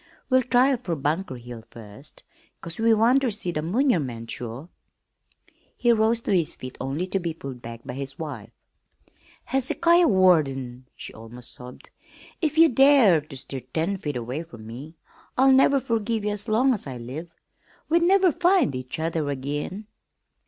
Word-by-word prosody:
We'll 260 0 +5
try 255 +2 +3
fer 190 -9 -4
Bunker 150 +1 -2
Hill 120 -2 -10
first, 115 +6 -12 0.4
'cause 170 +3 -9
we 225 +1 +3
want 230 +5 +4
ter 260 - +1
see 200 -4 -2
the 155 - -2
munurmunt 160 - 0
sure." 120 +6 -6 1.1
He 240 -1 +3
rose 225 +1 +2
to - - -1
his 170 -5 +1
feet 130 0 -9
only 140 +7 -2
to 195 +1 -2
be 170 -3 -4
pulled 135 -5 -8
back 115 0 -9
by - - -6
his 135 +1 -6
wife. 130 -9 -7 1.0
"Hezekiah 335 +6 +3
Warden!" 135 - +2
she - - -9
almost 115 +2 -10
sobbed. 125 0 -12 0.5
"If 315 -1 -1
you 330 +1 +8
dare 265 - +5
ter 145 -2 -12
stir 135 +1 -6
ten 160 - -2
feet 150 -6 -4
away 125 +5 -4
from 120 -10 -12
me 135 +9 -9 0.4
I'll 265 +1 +6
never 270 +1 +5
furgive 225 -2 -1
ye 210 - 0
as 205 +2 -4
long 255 +5 +3
as 205 - -5
I 130 -2 -6
live. 150 +8 -8 0.5
We'd 335 +2 +3
never 370 +1 +4
find 350 - +2
each 130 0 -5
other 160 -2 -2
ag'in!" 145 +9 -4
165 Hz, 165 wpm, -24 LUFS, -, 1.1 s, you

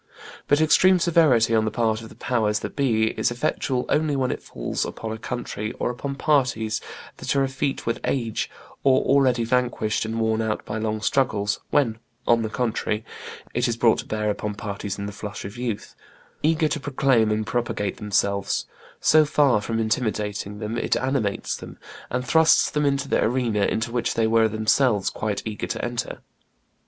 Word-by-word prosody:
But 145 - +4
extreme 185 +4 +5
severity 155 -10 +4
on 110 -1 +4
the - - +1
part 110 -1 0
of 110 - -10
the - - -14
powers 110 -4 0
that - - -6
be 110 -6 +2
is - - +2
effectual 125 +1 -1
only 150 -1 +1
when 130 -2 0
it - - -4
falls - - -3
upon 110 - -5
a 110 - -4
country 110 -3 -4
or - - -2
upon 140 +3 -5
parties 130 -7 +1 0.4
that - - -2
are 140 - +3
effete 135 +1 -2
with 115 - -1
age, 115 -5 -1 0.3
or 130 -1 +4
already 130 -3 +3
vanquished 120 -2 0
and 110 +1 -3
worn 110 0 +1
out 110 -1 -2
by 105 +1 -4
long 110 0 -2
struggles; 105 -6 +1
when, 115 -6 +1 0.3
on 115 -1 +4
the 110 - -2
contrary, 110 -2 -1 0.5
it 120 +1 +1
is 115 -1 -1
brought 115 -2 +4
to - - -6
bear 105 -1 0
upon 105 0 -4
parties 100 -1 -5
in 100 - -4
the 100 - -4
flush 105 +1 -7
of 100 +3 -7
youth, 120 -4 -4 0.5
eager 160 +1 +2
to 150 - -2
proclaim 135 -5 +2
and 105 0 0
propagate 110 -4 -2
themselves, 100 -1 0 0.3
so 155 0 +5
far 145 -7 +3
from 115 +2 -2
intimidating 105 -3 -1
them, 110 +2 -3
it - - +1
animates 130 -6 -1
them, - - -10 0.3
and 125 +1 -2
thrusts 160 +5 +4
them 150 -1 +1
into 140 -1 0
the - - +2
arena 115 -4 +1
into 115 +1 -1
which 120 -1 -1
they 115 - +2
were 115 0 +4
of 110 - 0
themselves 110 0 +2
quite 105 -2 -3
eager 110 -2 -4
to - - -3
enter. 120 0 -4
115 Hz, 185 wpm, -24 LUFS, 110-130 Hz, 0.5 s, extreme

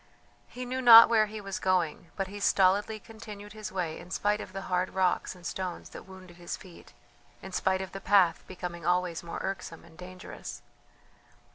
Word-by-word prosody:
He 250 +1 -7
knew 255 +1 -3
not 230 -2 +10
where 220 -2 +4
he 215 +1 -7
was 195 -2 -5
going, 180 -3 0
but 195 - -1
he 200 +2 -8
stolidly 200 +2 +2
continued 210 -2 -11
his 215 -2 -7
way 175 -4 -3
in 180 - -12
spite 210 +2 0
of - - -9
the 195 0 -6
hard 180 0 -1
rocks 185 0 +1
and 180 -1 -15
stones 185 -1 -5
that - - -11
wounded 185 -2 -13
his 175 -1 -5
feet, 180 -3 -15 0.5
in 190 - -8
spite 190 +1 0
of 190 - -9
the 195 - -7
path 190 -4 +3
becoming 175 -2 -7
always 180 0 0
more 170 -1 -7
irksome 185 -4 -5
and 165 -1 -19
dangerous. 185 +1 -9
190 Hz, 185 wpm, -29 LUFS, 180-205 Hz, 0.5 s, not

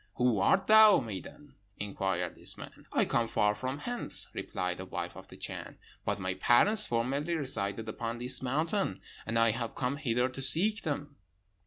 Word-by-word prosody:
'Who 125 -4 +2
art 190 - +3
thou, 215 -1 +8
maiden?' 115 - -8 0.2
inquired 95 -3 -2
this - - -1
man. - - -12
'I - - +2
come 115 -1 +1
far 105 -1 +2
from 130 +6 -4
hence,' 240 +10 0
replied 90 -1 -3
the 95 - -7
wife - - -5
of - - -11
the - - -13
Chan; - - -7 0.3
'but - - 0
my 95 0 -2
parents 195 - +4
formerly 135 +8 -1
resided 110 -7 -3
upon 115 +1 -4
this 125 +2 -1
mountain, 150 - -1 0.3
and 115 +1 0
I 115 0 +4
have 115 +1 -4
come 130 +2 -1
hither 125 -4 +1
to 130 +1 -7
seek 205 +11 +3
them.' 145 -1 -4
125 Hz, 175 wpm, -30 LUFS, 105-150 Hz, 0.3 s, thou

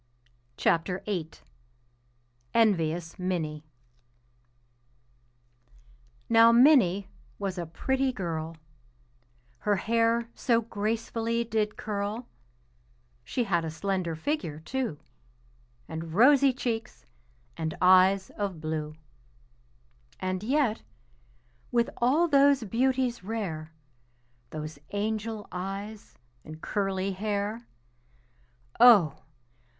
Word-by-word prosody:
ENVIOUS 170 -7 +1
MINNIE 160 -5 -2 2.6
Now 230 0 +7
Minnie 235 - +5 0.3
was 195 -2 -3
a 170 - -4
pretty 265 +10 0
girl, 165 -7 -4 1.0
Her 205 -1 +1
hair 230 +3 +1
so 235 -3 +1
gracefully 230 +2 -2
did 215 -2 -1
curl; 210 +3 -4 1.0
She 245 - -1
had 175 -6 0
a 160 - -3
slender 175 +1 -2
figure, 165 - -3
too, 245 - -3 0.9
And 160 0 -6
rosy 275 +4 +6
cheeks, 235 -3 -4 0.5
and 160 -1 -4
eyes 185 +1 +5
of 195 -5 -4
blue. 155 -1 -4 1.2
And 185 0 -2
yet, 255 -1 +1 0.9
with 235 -1 +1
all 285 +8 +3
those 280 -3 +4
beauties 245 0 0
rare, 180 -8 -4 0.8
Those 155 -1 -7
angel 215 +1 -3
eyes 195 - -6 0.3
and 155 0 -10
curly 195 0 -1
hair, 205 +3 -3 1.1
Oh! 205 - +7
205 Hz, 85 wpm, -28 LUFS, 175-235 Hz, 2.6 s, Now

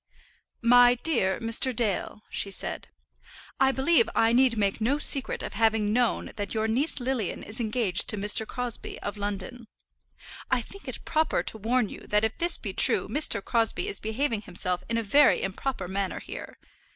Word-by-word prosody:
MY 245 +1 +6
DEAR 215 -12 +1
MR. 230 +2 +2
DALE 215 -1 -2
[she 200 - -1
said], 195 - -2 0.7
I 265 0 +4
believe 270 -1 +2
I 225 +1 +3
need 250 -2 +3
make 200 +1 0
no 260 +6 +1
secret 280 -2 +1
of - - -6
having 220 -1 +1
known 240 -1 0
that 205 +1 -4
your 220 0 0
niece 270 +8 0
Lilian 245 -6 -3
is 215 +4 -6
engaged 220 -4 0
to 210 - 0
Mr. 210 +2 +1
Crosbie, 245 -2 -5
of 205 - -4
London. 205 +4 -5 0.8
I 260 - +2
think 395 - -14
it - - -6
proper 320 -1 0
to - - -5
warn 235 +2 +1
you - - -11
that 210 +1 +1
if 220 - -3
this 345 +1 +4
be - - -6
true - - +3
Mr. 260 -9 +2
Crosbie 230 - 0
is 415 - -4
behaving 225 +1 -2
himself 180 -1 0
in 230 - 0
a 230 - -1
very 280 +6 +4
improper 195 +1 -3
manner 190 0 -3
here. - - -9
230 Hz, 175 wpm, -27 LUFS, 210-255 Hz, 0.8 s, MY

